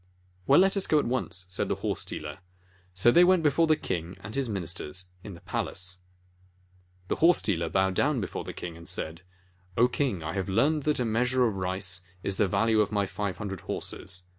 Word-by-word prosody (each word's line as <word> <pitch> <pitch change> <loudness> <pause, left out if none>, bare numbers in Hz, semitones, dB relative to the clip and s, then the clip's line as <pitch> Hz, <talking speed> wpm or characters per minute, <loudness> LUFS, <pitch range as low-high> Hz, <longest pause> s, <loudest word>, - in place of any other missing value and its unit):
"Well, 140 - +7
let 190 +2 +4
us 195 - +1
go 155 - +4
at 150 - +2
once," 115 -7 -1
said 90 - 0
the - - +1
horse - - -2
dealer. 75 +1 -5 0.6
So 95 +6 +6
they 175 - +7
went 180 -2 +4
before 155 +2 +3
the 155 - +5
king 90 - -4
and 110 - -8
his 135 -2 -1
ministers 90 -1 -4
in 100 - -8
the 85 - -14
palace. 95 -2 -3 1.1
The - - -1
horse 170 +2 +5
dealer 85 -5 0
bowed 95 +1 +2
down 140 +6 +2
before 100 - -4
the - - -6
king, 85 -2 -7
and 85 0 -12
said: 80 +2 -3 0.6
"O 120 +2 +6
King, 125 - -1
I 80 - -3
have 95 0 -2
learned 140 +9 +2
that 150 -2 +2
a 125 - +1
measure 125 +3 +2
of 110 -4 0
rice 95 0 -1 0.2
is 95 -1 -2
the 105 - +3
value 110 +3 +3
of 105 - 0
my 100 -1 +1
five 100 0 -4
hundred 95 -4 -5
horses. 90 +2 -4
100 Hz, 210 wpm, -28 LUFS, 90-130 Hz, 1.1 s, Well